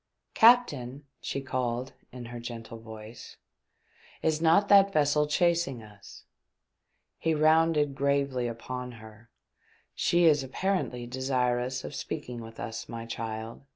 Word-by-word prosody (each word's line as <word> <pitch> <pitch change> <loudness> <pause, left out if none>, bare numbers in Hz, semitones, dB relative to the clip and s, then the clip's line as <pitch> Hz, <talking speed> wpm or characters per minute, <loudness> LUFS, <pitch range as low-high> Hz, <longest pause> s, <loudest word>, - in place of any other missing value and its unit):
" - - -53
Captain," 145 - +4
she 140 - -4
called 130 0 -3 0.2
in 125 -1 -8
her 120 0 -7
gentle 115 -1 -8
voice, 110 0 -11 0.4
" - - -43 0.3
is 160 -1 +1
not 170 +5 +4
that 200 -1 +6
vessel 150 -2 +2
chasing 165 -6 +1
us 105 -2 -14 1.0
T 165 - 0
He 160 - +3
rounded 155 -1 +3
gravely 140 -3 0
upon 125 +2 -6
her: 110 0 -14 0.6
"She 175 0 +2
is 150 -3 +5
apparently 135 -4 -2
desirous 125 0 -1
of - - -7
speaking 125 -2 -5
with 115 0 -11
us, 115 -1 -6
my 115 -1 -6
child. 115 0 -6
130 Hz, 135 wpm, -28 LUFS, 115-150 Hz, 1.0 s, that